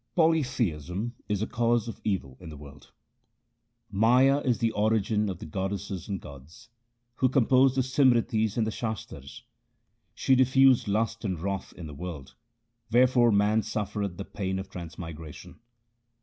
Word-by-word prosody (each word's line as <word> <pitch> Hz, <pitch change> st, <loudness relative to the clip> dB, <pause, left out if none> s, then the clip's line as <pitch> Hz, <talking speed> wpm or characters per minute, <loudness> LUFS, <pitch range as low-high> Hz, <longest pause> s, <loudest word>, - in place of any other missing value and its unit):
Polytheism 120 Hz, -, 0 dB, 0.2 s
is 105 Hz, 0 st, 0 dB
a -, -, 0 dB
cause 120 Hz, 0 st, 0 dB
of 115 Hz, -, -8 dB
evil 80 Hz, -11 st, -2 dB
in 90 Hz, -, -10 dB
the 75 Hz, -, -9 dB
world: 70 Hz, 0 st, -14 dB, 0.6 s
— 115 Hz, -1 st, -44 dB
Maya 130 Hz, +4 st, +5 dB
is 125 Hz, -5 st, 0 dB
the 115 Hz, -2 st, 0 dB
origin 105 Hz, -1 st, +1 dB
of 95 Hz, -, -4 dB
the -, -, -9 dB
goddesses 95 Hz, +2 st, -4 dB
and 100 Hz, -2 st, -3 dB
gods 70 Hz, -, -13 dB, 0.5 s
Who 130 Hz, -, +3 dB
composed 130 Hz, +1 st, +4 dB
the -, -, +4 dB
Simritis 120 Hz, -5 st, +2 dB
and 115 Hz, -, +2 dB
the 110 Hz, -, -2 dB
Shastars. 85 Hz, -, -6 dB, 0.7 s
She 135 Hz, -, +2 dB
diffused 130 Hz, -1 st, +4 dB
lust 115 Hz, +3 st, -1 dB
and 95 Hz, -6 st, -2 dB
wrath 95 Hz, +2 st, -4 dB
in 85 Hz, -, -9 dB
the 75 Hz, -, -8 dB
world, 70 Hz, -4 st, -8 dB, 0.6 s
wherefore 120 Hz, 0 st, +4 dB
man 105 Hz, +2 st, +3 dB
suffereth 105 Hz, -3 st, -3 dB
the 100 Hz, -, -6 dB
pain 95 Hz, -1 st, -3 dB
of 95 Hz, 0 st, -7 dB
transmigration. 80 Hz, -1 st, -9 dB
105 Hz, 150 wpm, -27 LUFS, 90-120 Hz, 0.7 s, Maya